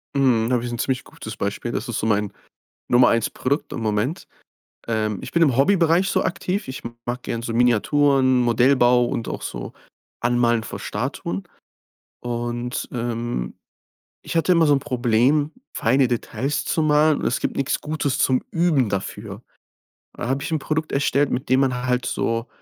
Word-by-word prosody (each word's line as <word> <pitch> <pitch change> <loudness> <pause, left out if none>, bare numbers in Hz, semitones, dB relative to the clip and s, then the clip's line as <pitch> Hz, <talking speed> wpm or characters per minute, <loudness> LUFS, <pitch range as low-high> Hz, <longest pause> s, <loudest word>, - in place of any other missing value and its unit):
Mhm, 125 -4 +3
da 125 - +3
habe 120 0 -1
ich 120 - -4
'n 120 - -5
ziemlich 130 0 -1
gutes - - -9
Beispiel. - - -3
Das - - -3
ist - - -2
so - - -2
mein 105 -2 +1 0.6
Nummer 125 +1 +5
1 115 -2 +1
Produkt 140 +4 -2
im 115 - -4
Moment. 110 +8 -1 0.6
Ähm. 110 -3 -1
Ich - - -8
bin 170 - +1
im 140 -7 +4
Hobbybereich 170 +5 +3
so - - +1
aktiv. 185 0 -2
Ich 130 - -6 0.2
mag 125 +1 -4
gerne 115 0 -4
so 115 - -3
Miniaturen, 130 +2 +3
Modellbau 120 +1 +4
und 115 - -3
auch - - -5
so - - -6 0.5
Anmalen 120 -1 +2
von - - -7
Statuen. 90 +3 -4 0.8
Und, 120 0 -3
ähm, 120 - -3 0.7
ich - - -7
hatte 165 - +2
immer 165 -2 +4
so 145 - +5
'n 135 - +3
Problem, 125 +4 +1 0.2
feine 135 0 +2
Details 130 +4 -2
zu 160 - 0
malen 150 0 +3
und - - -4
es 125 - 0
gibt - - -2
nix 135 0 0
Gutes 150 -3 -2
zum 130 -1 +2
Üben 165 -8 +2
dafür. 100 -1 -5 0.7
Da - - -5
habe 135 +1 0
ich 165 - -4
'n 160 - +1
Produkt 155 +2 -2
erstellt, 140 0 +2
mit 125 +2 -3
dem 130 +1 +4
man 125 -2 0
halt 125 0 0
so 115 -1 -1
125 Hz, 180 wpm, -22 LUFS, 120-145 Hz, 0.8 s, Nummer